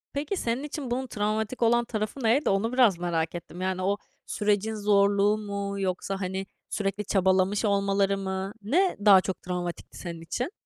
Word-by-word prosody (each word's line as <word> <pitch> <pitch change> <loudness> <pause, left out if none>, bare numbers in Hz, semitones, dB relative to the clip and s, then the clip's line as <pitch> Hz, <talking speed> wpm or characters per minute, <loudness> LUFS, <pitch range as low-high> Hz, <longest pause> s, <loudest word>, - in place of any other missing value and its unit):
Peki 295 +7 -2
senin 240 -2 -1
için 290 -3 -5
bunun 260 +2 -1
travmatik 215 +2 -2
olan 240 +1 +3
tarafı 220 +3 -4
neydi? 240 +7 +3
Onu 200 +5 +1
biraz 240 -8 +5
merak 170 -2 -1
ettim. 175 +1 -8
Yani 185 0 -1
o 200 +2 +1 0.3
sürecin 210 +1 0
zorluğu 205 0 +3
mu 200 -1 -4
yoksa, 195 +1 -2
hani, 190 +1 -3 0.2
sürekli 200 0 -2
çabalamış 190 +2 +2
olmaları 200 -1 +2
mı? 190 0 -3
Ne 350 - +2
daha 195 -3 +8
çok 190 0 -4
travmatikti 180 -1 -5
senin 170 -2 -7
için? 245 - -3
200 Hz, 165 wpm, -27 LUFS, 190-225 Hz, 0.3 s, daha